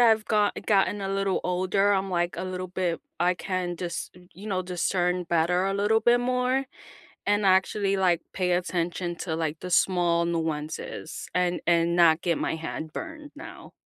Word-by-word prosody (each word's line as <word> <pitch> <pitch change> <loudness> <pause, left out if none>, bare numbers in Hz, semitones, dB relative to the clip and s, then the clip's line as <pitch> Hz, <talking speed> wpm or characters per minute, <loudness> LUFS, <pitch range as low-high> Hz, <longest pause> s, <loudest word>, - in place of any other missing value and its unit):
I've 220 -2 +5
go 210 -1 +2 0.2
gotten 200 0 +2
a 195 - -2
little 195 -1 0
older, 185 +3 +2
I'm, 195 -1 0
like, 175 -1 0
a - - -3
little 185 0 -4
bit 180 -2 -2 0.2
I 180 +1 +3
can 180 -2 -3
just, 170 -1 -4
y 180 0 -17
you 200 +4 -11
know, 185 -3 -1
discern 180 0 0
better 175 +2 +1
a 195 - 0
little 210 +2 +2
bit 240 +1 +4
more 250 +2 +1 0.6
and 205 0 +2
actually, 195 +1 +3
like, 180 -3 +2
pay 180 -2 0
attention 175 0 -1
to 170 -2 -3
like 160 -1 -2
the 180 - -5
small 175 -2 +3
nuances 160 -1 -4
and 180 -1 0
and 170 0 +3
not 170 -2 +5
get 170 -3 0
my - - -1
hand 160 0 -6
burned 310 -2 -7
now. 330 +3 -11
180 Hz, 180 wpm, -26 LUFS, 170-195 Hz, 0.6 s, I've